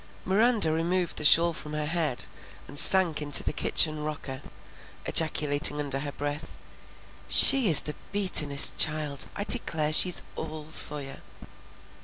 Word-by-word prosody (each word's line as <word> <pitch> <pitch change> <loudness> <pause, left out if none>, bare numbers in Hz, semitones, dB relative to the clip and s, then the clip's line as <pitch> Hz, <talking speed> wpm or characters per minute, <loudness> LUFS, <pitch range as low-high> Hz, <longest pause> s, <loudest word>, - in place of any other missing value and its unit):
Miranda 210 -3 -2
removed 170 +2 -6
the - - -8
shawl 170 +3 +3
from 150 -1 -12
her 150 0 -7
head 155 -5 -4 0.4
and 145 - -3
sank 175 -5 +1
into 145 -1 +3
the - - -7
kitchen 155 -2 -3
rocker, 145 -3 -10 0.6
ejaculating 150 -2 0
under 140 -2 -6
her 145 0 -9
breath, 145 +1 -10 0.7
"She 265 -7 +6
is 155 - +7
the 150 - -8 0.2
beatin'est 155 -8 +4
child! 150 -3 -2
I 205 - -7
declare 160 -10 0
she's 180 +3 +2
all 155 -1 -12
Sawyer!" 145 -3 +1
155 Hz, 135 wpm, -22 LUFS, 145-170 Hz, 0.7 s, is